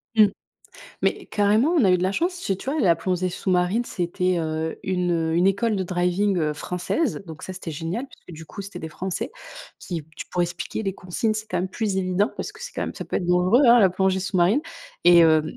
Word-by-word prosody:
Mmh 215 -2 +7 0.8
mais - - 0
carrément 210 +7 +2
on 320 -9 +4
a 190 - +5
eu 180 - +4
de - - -2
la 190 +1 +1
chance 345 - 0
c'est 200 - -2
tu 260 - -5
vois? 305 +2 -1
La 175 -8 +4
plongée 185 +2 -1
sous-marine 185 +5 0
c'était, 180 -1 -1
heu, 160 0 -2
une, 180 -2 0
heu, 165 -1 0
une 175 +2 +3
école 205 +3 +2
de 190 - 0
driving 180 -2 0
française, 180 - -2
donc 160 -1 -10
ça 185 - -6
c'était 185 -2 -7
génial 165 - -4
puisque 175 - -14
du 160 +1 -10
coup 200 - -8
c'était 195 -2 -8
des 160 - -6
français 185 +3 -4 0.5
qui 170 -3 -5
t - - -30 0.2
pour 180 - -1
expliquer 175 +5 -3
les 195 -3 -2
consignes 195 +4 -2
c'est 215 0 -4
quand 180 - 0
même 185 +2 -1
plus 200 0 -2
évident 190 +3 +1
parce - - -5
que 450 - -13
c'est - - -7
quand - - -4
même - - -4
ça - - -6
peut - - -2
être 175 - -2
dangereux, 180 +7 +4
hein 240 +1 +8
la 195 -5 +5
plongée 190 +1 +1
sous-marine 195 - +2 0.4
et 175 -1 +8
heu, 160 -1 +5
185 Hz, 230 wpm, -24 LUFS, 175-205 Hz, 0.8 s, hein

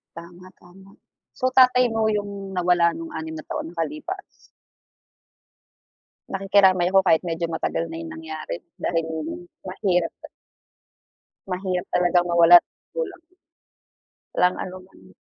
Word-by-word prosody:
Tama, 170 +2 -12
tama. 190 +2 -17 0.5
So 255 0 0
tatay 255 -1 +6
mo 220 -1 +1
yung 200 -2 -4
nawala 175 -1 +3
nung 165 0 -7
6 160 0 -5
na 155 - -8
taon - - -5
na - - -13
nakalipas. 310 - -4 2.1
Nakikiramay 190 -2 +3
ako 195 - +6
kahit 160 0 +4
medyo 170 -1 -2
matagal 165 0 -2
na 165 0 -7
yung 165 -1 -7
nangyari, 160 +1 -6 0.2
dahil 165 -2 0 0.6
mahirap 185 -3 0
ta - - -10 1.2
Mahirap 185 -1 -3
talagang 175 0 +3
mawalan 170 0 +8
ng - - 0 0.3
magulang. 390 -8 -4 1.1
Walang 180 0 +2
anuman. 185 0 -12
180 Hz, 120 wpm, -23 LUFS, 170-195 Hz, 2.1 s, mawalan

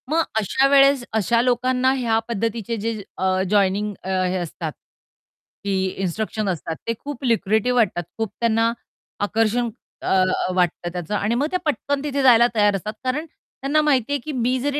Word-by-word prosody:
मग 325 +2 +2 0.2
अशा 260 +6 +2
वेळेस 275 -1 +5
अशा 220 +2 +2
लोकांना 250 +1 +2
ह्या 230 -3 +1
पद्धतीचे 230 0 -2
जे 220 0 -3 0.2
अ, 185 0 +1
जॉइनिंग 205 +1 +2
अ, 190 - -5 0.2
हे 180 +1 -1
असतात 170 -2 -4 0.9
की 200 -1 -1 0.3
इन्स्ट्रक्शन 215 +3 -2
असतात 165 -2 -3
ते 230 - +1
खूप 285 -2 -7
लुक्रेटिव्ह 230 +1 +1
वाटतात. 210 -7 +2
खूप 225 -3 -2
त्यांना 230 0 +2 0.5
आकर्षण 225 +3 +1 0.3
अ, - - -5
अ, 185 -1 +2
वाटतं 175 -1 0
त्याचं 180 +3 -3
आणि 210 +3 0
मग 280 +5 +1
ते 365 - +1
पटकन 285 -2 -1
तिथे 285 -1 -1
जायला 240 -2 +7
तयार 205 -2 +4
असतात. 210 +3 -4
कारण 265 +5 -1
त्यांना 300 -1 -2
माहितीये 285 -2 +1
की 305 +5 -6
मी 255 -1 0
जरी 285 +2 -1
230 Hz, 165 wpm, -22 LUFS, 200-260 Hz, 0.9 s, जायला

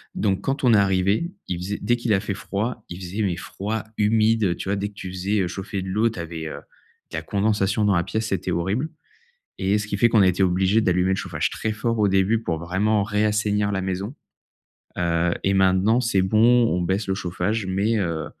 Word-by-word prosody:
Donc 100 -2 0
quand 135 0 -2
on 120 -2 +5
est - - +6
arrivés, 100 - +2 0.2
il 90 - -2
faisait 95 +4 -4
dès 120 - +2
qu'il 115 -3 0
a 95 - +3
fait 100 -1 -3
froid, 105 +3 -4
il 90 +1 -7
faisait 95 +4 -4
mais 90 -4 0
froid, 105 +4 -4
humide, 110 +1 +3
heu, 85 -2 +1
tu 95 - -6
vois? 100 - +1
Dès 100 +1 -2
que - - -20
tu 95 -2 -7
faisais, 100 +3 -1
heu, 90 - 0
chauffer 95 +2 -5
de 95 - -5
l'eau, 110 +4 +2
tu 110 - -8
avais, 80 -1 -5
heu, - - -7 0.5
de - - -4
la - - -2
condensation 105 0 0
dans 100 -3 +3
la 85 - +2
pièce, 110 +4 -2
c'était 95 -2 -2
horrible 100 - -1 0.7
et 100 +2 +2
ce 105 - -3
qui 100 - -2
fait 120 +4 +4
qu'on 110 -3 +5
a - - +5
été 90 +1 +1
obligés 95 +4 +3
d'allumer 90 -1 +2
le - - +2
chauffage - - -2
très 110 - -2
fort, 115 +1 -1
au 105 - +4
début, 95 +4 +2
pour 85 -7 -2
vraiment 100 +5 +1
réassainir 105 0 +1
la 95 -1 -1
maison, 95 +7 -3 0.8
heu 85 0 +1
et 95 - +2
maintenant, 95 +5 +3
c'est 100 -6 +1
bon. 115 +4 +4
On 90 - 0
baisse 95 +4 -1
le 95 - +1
chauffage 95 +3 -2
mais 100 +5 +1
heu, 85 -4 -2
100 Hz, 230 wpm, -23 LUFS, 95-110 Hz, 0.8 s, est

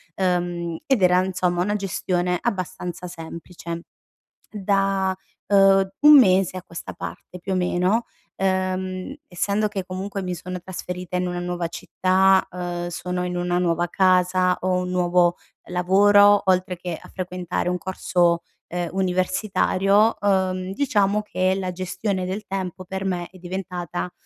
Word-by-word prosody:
uhm, 175 -2 -1
ed 265 -6 +2
era 180 0 +5
insomma 180 -2 0
una 205 +3 0
gestione 180 -2 -1
abbastanza 185 -4 -4
semplice. 170 0 -8 0.7
Da, 195 -2 +1 0.3
uhm, 195 -1 +5
1 295 0 +9
mese 185 -5 +4
a 185 - -5
questa 170 - -8
parte 180 - -8
più 190 +2 -5
o - - +1
meno, 185 +5 +1 0.3
uhm, 185 +3 -1
essendo 200 +4 0
che 195 -3 -4
comunque 195 +2 -5
mi 180 -1 -3
sono 180 +1 -6
trasferita 180 0 -6
in 180 0 0
una 175 0 -3
nuova 175 -1 -3
città, 190 +2 +2
uhm, 175 -1 -4
sono 180 +1 -3
in 180 0 -3
una 175 0 0
nuova 175 -1 +1
casa, 185 0 +3
ho 185 0 +1
un 180 - -4
nuovo 175 -1 +2 0.3
lavoro 205 +3 +5
oltre 185 -1 +2
che 175 -2 -5
a - - -14
frequentare 180 -1 -3
un 180 0 0
corso, 180 -2 +1 0.3
uhm, 175 -1 -2
universitario, 190 +3 +2
uhm, 190 -2 0
diciamo 210 -4 +1
che 185 -2 0
la 185 -1 -2
gestione 185 +1 -3
del 190 +3 -4
tempo 185 -1 -4
per 190 +1 -5
me 180 -2 -2
è, 185 - -15
diventata, 180 -1 -5
185 Hz, 145 wpm, -23 LUFS, 180-195 Hz, 0.7 s, 1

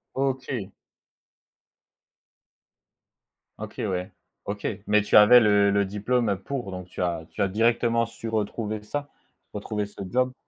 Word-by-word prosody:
OK. 130 -6 -2 2.9
OK, - - -7
ouais. 90 -1 -3 0.3
OK, 100 0 -3 0.2
mais 105 0 +4
tu - - 0
avais 105 +4 +9
le 105 -2 +4
le 100 0 +2
diplôme, 105 +4 0
heu, 100 -2 -1
pour, 120 -3 -5
donc 90 -1 -7
tu - - -7
as 85 -2 -1
tu - - -6
as - - +3
directement 115 +3 +2
su 115 0 -9
retrouver 110 0 -2
ça? 145 +7 -5 0.4
Retrouver 105 0 -3
ce 105 - -11
job. 125 +2 +1
105 Hz, 140 wpm, -25 LUFS, 100-120 Hz, 2.9 s, avais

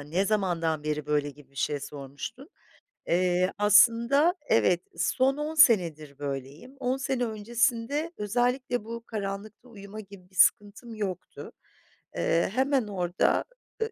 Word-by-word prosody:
"Ne 160 +7 -1
zamandan 175 -7 0
beri 150 -1 -2
böyle?" 145 -1 0
gibi 145 -1 -18
bir 140 - -25
şey 145 +2 -1
sormuştun. 145 - -8 0.6
Eee, 180 +1 +2
aslında 235 - +5 0.2
evet, 180 -5 +3 0.2
son 265 +2 +1
10 300 +2 -3
senedir 170 - +4
böyleyim. 140 - -6
10 255 0 0
sene 265 -2 -1
öncesinde 235 +7 -1
özellikle 245 +3 0
bu 230 0 -7
karanlıkta 210 +1 -6
uyuma 205 -1 -10
gibi 195 -3 -13
bir 190 - -23
sıkıntım 210 +5 +2
yoktu. 195 -5 -6 0.6
Eee, 165 +1 +1
hemen 265 -1 +1
orada, 180 -3 0 0.4
ııı, 445 +1 -1
205 Hz, 130 wpm, -27 LUFS, 170-245 Hz, 0.6 s, aslında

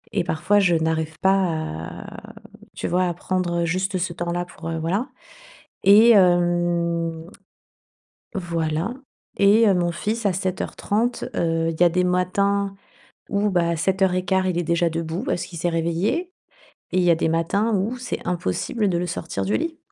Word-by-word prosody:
et 190 - +2
parfois, 175 +5 +1
je 180 -4 +3
n'arrive 160 -1 -1
pas 190 - +4
à, 160 - -4 0.4
tu - - -3
vois, 180 +1 +1
à 175 - -1
prendre 175 -1 -1
juste 185 +3 -1
ce 180 -1 -2
temps-là 175 +1 -3
pour, 165 -2 -9
heu, 165 - -2
voilà. 190 - -1 0.8
E, 215 +4 +8
hem, 175 -3 +2 1.1
voilà 170 +1 -2 0.4
et 205 +3 +5
heu, 200 - +5
mon 175 -1 +1
fils 215 +6 -3
à 200 - +3
7:30, 185 0 -3 0.6
heu, 165 -1 0
il 160 - -5
y - - +9
a 175 - +6
des 180 +2 +1
matins 195 +2 +1 0.5
où, 205 +1 +1
bah, 175 -3 +1
à 170 - 0
7:15, 190 +2 +1
il 180 -2 -1
est - - -1
déjà 170 +1 +1
debout 165 +4 -3
parce 255 - -2
qu'il 170 - -10
s'est 175 +2 0
réveillé 170 - -1 0.6
et - - 0
il 185 - +3
y 175 - +3
a - - +5
des 160 - 0
matins 195 +7 +1
où 210 +6 -1
c'est 250 0 -5
impossible 180 - -1
de 175 - 0
le 175 +1 -2
sortir 170 -1 -4
du 205 - +1
lit. 325 0 -3
175 Hz, 170 wpm, -23 LUFS, 165-195 Hz, 1.1 s, y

